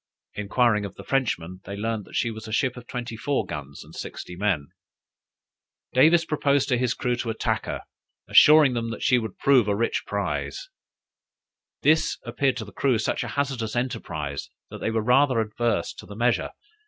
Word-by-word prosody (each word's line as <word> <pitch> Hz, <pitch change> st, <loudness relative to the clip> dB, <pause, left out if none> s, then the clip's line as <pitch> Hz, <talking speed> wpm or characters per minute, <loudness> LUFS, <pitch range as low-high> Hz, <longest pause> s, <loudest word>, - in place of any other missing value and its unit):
Enquiring 105 Hz, +1 st, +1 dB
of 100 Hz, -1 st, -6 dB
the -, -, -10 dB
Frenchmen, 95 Hz, -10 st, -1 dB
they 100 Hz, -, -6 dB
learned 110 Hz, 0 st, -2 dB
that -, -, -12 dB
she 120 Hz, -, +1 dB
was 110 Hz, 0 st, -8 dB
a -, -, -7 dB
ship 125 Hz, +3 st, +1 dB
of 125 Hz, -1 st, -11 dB
twenty 120 Hz, -2 st, -5 dB
four 125 Hz, 0 st, -1 dB
guns 70 Hz, -4 st, -7 dB
and -, -, -16 dB
sixty 90 Hz, -, -7 dB
men. 90 Hz, -7 st, 0 dB, 1.2 s
Davis 160 Hz, +6 st, +5 dB
proposed 145 Hz, -3 st, +1 dB
to 125 Hz, -, +3 dB
his 125 Hz, -2 st, 0 dB
crew 125 Hz, -1 st, 0 dB
to 120 Hz, -1 st, -4 dB
attack 110 Hz, -, -1 dB
her, -, -, -3 dB, 0.5 s
assuring 150 Hz, -3 st, +7 dB
them 115 Hz, -1 st, -2 dB
that 115 Hz, -, -5 dB
she 125 Hz, -, +4 dB
would 110 Hz, -4 st, -6 dB
prove 130 Hz, -6 st, +4 dB
a 100 Hz, -, +1 dB
rich 115 Hz, +3 st, 0 dB
prize. -, -, -3 dB, 1.1 s
This 160 Hz, +1 st, +3 dB
appeared 135 Hz, -4 st, 0 dB
to 110 Hz, -, -4 dB
the 105 Hz, -, -12 dB
crew 130 Hz, +1 st, +2 dB
such 110 Hz, +3 st, -1 dB
a -, -, -4 dB
hazardous 130 Hz, -6 st, -1 dB
enterprise, 75 Hz, -, -3 dB, 0.2 s
that -, -, -7 dB
they -, -, 0 dB
were 110 Hz, -1 st, 0 dB
rather 130 Hz, +1 st, +4 dB
adverse 115 Hz, +2 st, -1 dB
to -, -, -12 dB
the 100 Hz, -, -9 dB
measure. 120 Hz, +2 st, +1 dB
115 Hz, 185 wpm, -25 LUFS, 105-130 Hz, 1.2 s, assuring